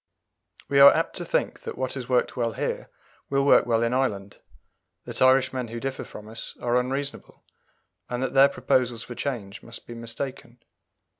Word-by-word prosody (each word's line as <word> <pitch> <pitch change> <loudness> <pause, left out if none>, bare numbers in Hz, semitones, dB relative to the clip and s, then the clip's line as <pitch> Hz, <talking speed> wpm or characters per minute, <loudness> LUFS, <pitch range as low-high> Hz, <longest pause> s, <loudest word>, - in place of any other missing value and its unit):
We 140 - +3
are 140 0 +11
apt - - -1
to - - -4
think - - -1
that - - -7
what 130 0 -2
has 130 -2 -6
worked 125 -1 +1
well 115 -2 -1
here - - -3 0.4
will 140 0 +1
work 140 - +5
well 115 -1 +2
in 115 +1 0
Ireland; 100 -7 -1 0.7
that - - -6
Irishmen 130 -1 +3
who 115 +1 -6
differ 135 +1 -4
from 105 - -11
us 110 +1 -8
are 120 0 0
unreasonable; 135 +3 -4 0.7
and 125 +1 -2
that 130 - -2
their 135 +1 +7
proposals 120 -4 0
for 125 - -8
change 115 -5 -4
must 115 0 -9
be 120 - -9
mistaken. 120 +1 -6
125 Hz, 175 wpm, -25 LUFS, 115-135 Hz, 0.7 s, are